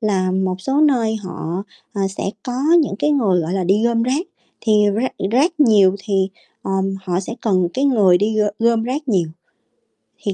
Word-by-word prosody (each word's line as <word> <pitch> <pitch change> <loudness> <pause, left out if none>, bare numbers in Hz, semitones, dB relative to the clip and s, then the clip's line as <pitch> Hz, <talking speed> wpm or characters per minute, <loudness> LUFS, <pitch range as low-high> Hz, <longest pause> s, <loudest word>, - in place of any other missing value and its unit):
là 195 -4 0
một 185 0 -1
số 270 +8 0
nơi 240 -7 +2
họ, 185 -3 -5 0.3
ờ, 200 - -3
sẽ 195 - -6 0.2
có 250 - -5 0.3
những 275 - -3
cái 300 - +1
người, 210 -11 +2
gọi 165 +1 -3
là, 190 -1 -1
đi 200 +5 +2
gom 235 -1 +1
rác. 270 +9 -1 0.3
Thì 220 - 0 0.2
rác 240 +5 -1 0.2
rác 305 +6 +1
nhiều 200 -7 +5
thì, 195 -2 0 0.3
ờ, - - -5 0.3
họ 180 -1 -1
sẽ 210 +4 -6
cần 185 -5 +1
cái 270 - 0
người 205 -10 +4
đi 215 +3 0
gom 210 -1 +2
gom 230 0 +2
rác 270 +5 -4
nhiều, 180 -8 +1 1.0
thì 200 - -1
215 Hz, 190 wpm, -19 LUFS, 190-245 Hz, 1.0 s, nhiều